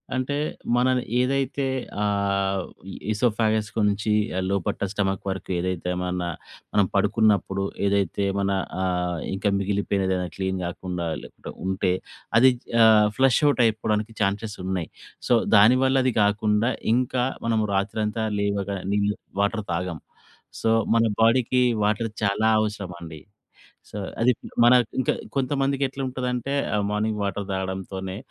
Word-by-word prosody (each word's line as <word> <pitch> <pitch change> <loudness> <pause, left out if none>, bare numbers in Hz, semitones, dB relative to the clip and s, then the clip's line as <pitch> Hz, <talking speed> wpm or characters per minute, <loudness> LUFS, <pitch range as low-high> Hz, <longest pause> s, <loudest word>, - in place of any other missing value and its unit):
అంటే 130 +2 -1 0.4
మనం 130 +1 +3 0.2
ఏదైతే 135 +1 0 0.4
ఆహ్, 100 -2 0 0.5
ఈసోఫాగస్‌కు 110 -1 0
నుంచి 105 +2 -1 0.4
లోపట్ట 100 -3 -1
స్టొమక్ 95 -2 -1
వరకు 95 -1 -5
ఏదైతే 90 0 -2
మన 90 0 -2 0.6
మనం 100 -2 +4
పడుకున్నప్పుడు 100 -1 +2 0.2
ఏదైతే 100 0 0
మన 100 0 0 0.3
ఆహ్, 90 -2 -1
ఇంకా 100 +1 0
మిగిలిపోయినదేదైనా 95 -2 0
క్లీన్ 95 -1 -2
కాకుండా 90 0 -4 0.2
లెక్క - - -10
ఉంటే 95 -1 +1 0.5
అది 130 +2 +7 0.3
ఆహ్, 105 -1 +6
ఫ్లష్ 135 -2 +4
ఔట్ 140 - +2
అయిపోవడానికి 110 0 0
ఛాన్సెస్ 105 +1 -1
ఉన్నాయి. 95 -4 -2 0.4
సో, - - +4 0.2
దానివల్ల 130 +6 +5
అది 130 - +2
కాకుండా 105 +3 +2 0.2
ఇంకా 125 0 +1 0.2
మనము 110 -2 +1
రాత్రంతా 105 +3 -1 0.2
లేవగానే 100 -1 -2
నీళ్ళు 105 0 +1 0.3
వాటర్ 105 +1 0
తాగం. 85 -1 -3 0.6
సో, 115 - +1 0.3
మన 115 - +4 0.2
బాడీకి 125 +2 +3 0.2
వాటర్ 110 +2 0
చాలా 100 +2 +2
అవసరం 105 -4 -3
అండి. 80 -2 -8 0.7
సో, 105 - -7 0.2
అది 125 +2 +5 0.3
మన 120 +1 +7 0.3
ఇంకా 130 - +1 0.2
కొంతమందికెట్లుంటదంటే 135 -1 -1 0.2
ఆహ్, 105 -1 +1
మార్నింగ్ 105 0 -1
వాటర్ 100 0 -2
తాగడంతోనే 95 0 -4
105 Hz, 120 wpm, -24 LUFS, 95-115 Hz, 0.7 s, అది